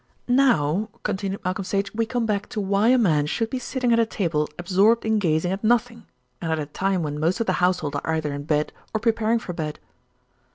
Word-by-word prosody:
"Now," 220 - +2
continued 200 -1 -3
Malcolm 185 +2 -1
Sage, 200 +1 -2
"we 225 +1 0
come 240 -1 -1
back 210 -1 -1
to 215 - -4
why 200 +2 +2
a 255 +1 +5
man 155 -10 +2
should 225 +8 -2
be 260 - -2
sitting 250 -1 0
at 230 - +4
a 230 - +4
table 165 -8 -1
absorbed 195 +6 +3
in 220 -1 +2
gazing 170 -1 +1
at 195 +2 -3
nothing, 230 -1 +1 0.3
and 165 -2 -2
at 160 - +1
a 150 - -2
time 185 +4 -1
when 150 -1 -3
most 165 +7 +1
of 230 - 0
the 185 - +1
household 180 -5 +1
are 160 +3 -2
either 150 -2 -2
in 145 0 -6
bed 150 -1 0 0.2
or - - +2
preparing 230 0 +1
for 195 -6 -5
bed." 155 -2 -4
195 Hz, 220 wpm, -24 LUFS, 160-225 Hz, 0.3 s, a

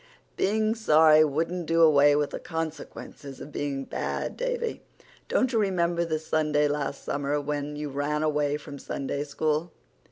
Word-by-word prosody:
"Being 215 +2 +1
sorry 155 -8 +6
wouldn't 165 +3 -1
do 165 0 +4
away 145 -2 +6
with 145 -1 0
the - - -5
consequences 160 -3 -6
of 150 - -9
being 140 -2 -3
bad, - - -3
Davy. 485 -2 -2 0.5
Don't 260 -1 +1
you 225 - +3
remember 170 -4 +1
the 160 -1 -1
Sunday 155 -1 +1
last 145 -1 -3
summer 145 +1 -1
when 145 0 -3
you 150 0 -4
ran 145 +2 -1
away 150 -1 +1
from 145 -1 -10
Sunday 140 +2 -3
School? 155 +3 -1
150 Hz, 155 wpm, -27 LUFS, 145-170 Hz, 0.5 s, sorry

